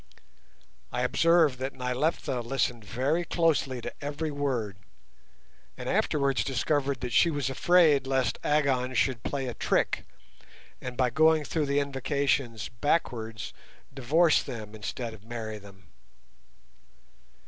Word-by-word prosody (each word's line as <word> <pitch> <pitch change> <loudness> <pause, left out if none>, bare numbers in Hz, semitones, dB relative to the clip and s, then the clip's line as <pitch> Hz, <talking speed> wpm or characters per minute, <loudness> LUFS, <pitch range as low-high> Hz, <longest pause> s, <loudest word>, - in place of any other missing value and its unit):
I 125 - -1
observed 160 0 +3
that 135 +1 -4
Nyleptha 125 +1 -1
listened 120 -1 -1
very 135 +11 0
closely 160 -7 +1
to - - -6
every 150 +2 -3
word, 125 -9 -2 1.0
and - - -6
afterwards 140 -2 +1
discovered 140 0 0
that 125 - -3
she 170 - +5
was 145 -4 -1
afraid 150 -2 +4
lest 135 -1 0
Agon 135 -4 +1
should 125 -1 +1
play 135 +3 -3
her 125 - -3
a - - -7
trick, - - 0 0.7
and 125 -1 -6
by 125 -2 +2
going 155 +3 +4
through 155 -1 -1
the 140 +1 +2
invocations 135 -4 -1
backwards 115 -5 -2 0.4
divorce 150 +5 +3
them 110 -3 -7
instead 110 +2 -5
of 105 -2 -14
marry 110 -2 -6
them. 95 -3 -17
135 Hz, 125 wpm, -28 LUFS, 120-145 Hz, 1.0 s, she